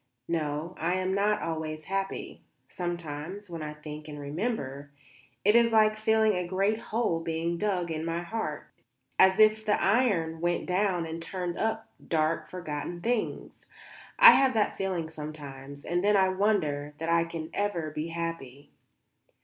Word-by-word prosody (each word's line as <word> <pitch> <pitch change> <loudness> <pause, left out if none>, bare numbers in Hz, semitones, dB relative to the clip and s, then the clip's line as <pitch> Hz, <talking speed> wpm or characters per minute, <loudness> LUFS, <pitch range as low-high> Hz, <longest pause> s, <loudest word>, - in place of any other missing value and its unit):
No, 155 +1 -2
I 175 +3 +1
am 185 0 0
not 205 +2 +1
always 155 -1 -3
happy. 195 +3 -4 0.3
Sometimes, 175 +2 -5
when 165 -2 -5
I 150 0 -5
think 150 0 -9
and 150 -1 -7
remember, 145 - -3 0.6
it 210 +2 +5
is 235 0 +5
like 215 -1 +5
feeling 220 0 +3
a 180 -2 -2
great 195 +4 +1
hole 220 -7 -1
being 165 +1 -2
dug 185 -5 0
in 160 0 -3
my 165 +1 -2
heart 175 -6 -4 0.5
as 190 0 +6
if 215 0 +5
the 210 -1 +2
iron 190 -8 +2
went 175 0 0
down 180 -2 +1
and 165 +1 -5
turned 175 0 -4
up 220 0 -1 0.2
dark 155 0 0
forgotten 175 -1 -5
things. 235 +2 -2 0.6
I - - +11
have 265 -2 +4
that 210 -2 +1
feeling 185 -4 -2
sometimes; 145 -3 -9
and 175 +2 0
then 205 0 +4
I 190 -1 +4
wonder 160 -8 0
that 165 +1 -3
I 170 0 +4
can 165 -1 -6
ever 175 -7 -1
be 155 +2 -3
happy." 165 -5 -5
170 Hz, 155 wpm, -28 LUFS, 155-205 Hz, 0.6 s, I